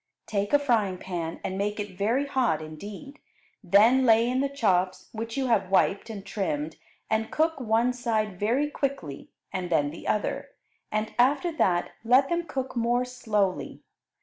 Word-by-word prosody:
Take 205 -1 -2
a 290 - +7
frying 225 -10 +1
pan 170 -3 -5
and 190 +1 -3
make 210 +1 -1
it 205 -2 -5
very 225 +9 +1
hot 255 - +1
indeed; 200 - -9 0.4
then 220 +8 +5
lay 230 -1 +5
in 255 +1 0
the 280 - 0
chops, 190 -9 0
which 225 +2 -5
you 270 - 0
have 210 -7 +2
wiped 195 +2 +2
and 200 -3 -7
trimmed, 160 -7 -3 0.3
and 220 0 0
cook 320 -1 +1
one 235 +1 +2
side 215 -6 -1
very 245 +8 +1
quickly, 275 - -4 0.2
and 180 -1 -3
then 145 -4 +2
the 165 - -9
other, 210 - -2 0.4
and 215 0 -2
after 285 +7 +3
that 180 - +1
let 255 +4 +4
them 340 0 -1
cook 265 -3 -4
more 240 +1 +1
slowly. 210 -6 -2
220 Hz, 165 wpm, -27 LUFS, 190-255 Hz, 0.4 s, a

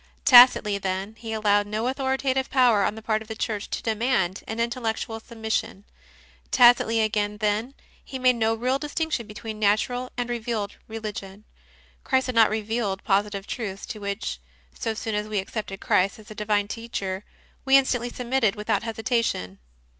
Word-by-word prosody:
Tacitly, 245 -6 +7
then, 190 +2 -3
he 225 -1 -6
allowed 205 -2 +2
no 215 +3 -2
authoritative 265 0 0
power 245 -6 +4
on 210 - 0
the 220 - -10
part 215 -1 0
of 220 - -11
the 220 - -6
Church 215 -2 -3
to - - -4
demand 215 -5 0
an 220 +1 -4
intellectual 230 -1 -2
submission; 220 -3 -3 0.7
tacitly, 240 -2 +5
again, 210 -1 0
then, 215 +5 -1 0.3
he 265 - -7
made 255 -1 +4
no 225 0 +2
real 255 +4 0
distinction 300 -5 -2
between 215 0 -7
Natural 230 +5 +1
and 245 -1 -1
Revealed 230 -4 -3
Religion: 210 -2 -7 0.6
Christ 260 -1 +1
had 255 - -3
not 225 -1 +6
revealed 215 -2 -2
positive 200 0 0
truths 200 -5 -5
to 215 - -7
which, 200 - -4 0.3
so 225 - -3
soon 220 0 -4
as 210 0 -1
we 215 -1 -3
accepted 195 0 -4
Christ 190 +2 +2
as 215 -1 -14
a - - -6
Divine 210 -1 0
Teacher, 205 -4 -4 0.4
we 270 0 +6
instantly 245 -3 +1
submitted 245 -3 0
without 210 0 -1
hesitation. 225 - -2
220 Hz, 160 wpm, -25 LUFS, 205-240 Hz, 0.7 s, Tacitly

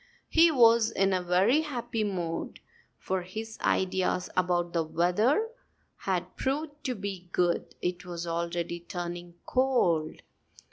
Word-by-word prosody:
He 335 +1 +6
was 230 -5 +5
in 195 -3 +1
a 185 - +1
very 190 - +3
happy 240 -7 -3
mood; 175 -5 -3 0.4
for 190 0 -2
his 220 +5 -7
ideas 185 -1 0
about 175 -1 +1
the 170 - +2
weather 210 - +2 0.5
had 185 -1 -2
proved 290 +2 -3
to 255 -2 -1
be 190 -3 -6
good. 175 -2 0
It 180 +1 -2
was 175 -2 -5
already 170 0 -2
turning 175 0 -6
cold. 180 -12 +1
185 Hz, 130 wpm, -29 LUFS, 175-230 Hz, 0.5 s, He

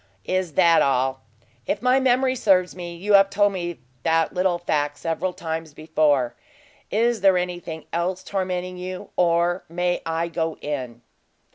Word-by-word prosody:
"Is 185 -4 -1
that 170 -1 +5
all? 130 0 +1 0.5
If 205 - -2
my 255 +1 +4
memory 260 0 +2
serves 185 -6 +2
me, 175 -1 -7
you 200 +5 -1
have 195 0 +7
told 205 0 +2
me 175 -2 -4 0.2
that 165 +2 +1
little 180 -1 +1
fact 145 -4 -1
several 165 +4 -2
times 160 -3 -5
before. 155 -5 +1 0.6
Is 230 0 +1
there 190 -1 +5
anything 175 -3 -4
else 180 +2 -1
tormenting 185 -2 -3
you, 185 0 -7
or 175 +1 +2
may 175 +1 -1
I 165 +1 -1
go 165 -1 -2
in?" 125 -5 -5
175 Hz, 150 wpm, -23 LUFS, 160-185 Hz, 0.6 s, have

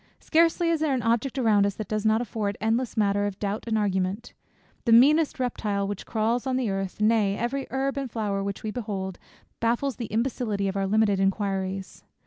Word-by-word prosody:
Scarcely 335 +1 +2
is 330 - +1
there 300 -3 +1
an 245 - -2
object 235 +4 0
around 220 -5 +4
us, 200 - -3
that 215 - -5
does 215 +1 -1
not 220 +1 +3
afford 210 -3 -3
endless 225 +3 0
matter 205 -1 +2
of 195 -2 -5
doubt 205 +1 -3
and 220 -1 +1
argument. 195 +2 -1 0.5
The 235 - +2
meanest 295 +6 +5
reptile 210 -5 -1
which 200 -1 -5
crawls 230 +3 0
on 260 -1 +1
the 245 -6 0
earth, 195 0 -4
nay, 210 -2 +3
every 265 +4 -2
herb 270 +1 -1
and 270 -2 -3
flower 205 -3 -2
which 200 0 -4
we 215 - -2
behold, 200 -6 -4 0.4
baffles 240 +2 0
the 235 - -4
imbecility 220 -3 -1
of 195 - -3
our 195 -1 0
limited 205 -1 +2
inquiries. 195 -1 -2
220 Hz, 195 wpm, -26 LUFS, 200-245 Hz, 0.5 s, meanest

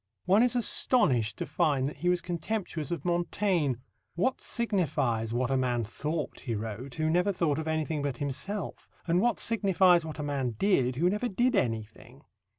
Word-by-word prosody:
One 195 +4 +5
is 245 0 +3
astonished 135 - +2
to - - -3
find 145 -6 +1
that 145 - -4
he 175 - 0
was 180 -1 +2
contemptuous 170 -1 -3
of 170 -3 -4
Montaigne. 175 -4 +1 0.4
"What 255 +10 0
signifies 140 - -1
what 125 +2 0
a 135 - +2
man 125 -2 0
thought," 150 +7 -4
he 120 -3 -3
wrote, 110 +5 -6
"who 155 0 0
never 180 +5 +2
thought 160 -6 0
of 160 - -4
anything 155 -1 -1
but 140 -2 -2
himself, 165 +9 -4 0.2
and 175 +2 +2
what 240 +1 +2
signifies 190 -6 +3
what 155 -1 -7
a 150 - -4
man 135 -5 -2
did 130 - +2
who 165 +7 +2
never 210 +6 0
did 245 +4 +1
anything?" 115 - -3
160 Hz, 175 wpm, -29 LUFS, 130-190 Hz, 0.4 s, One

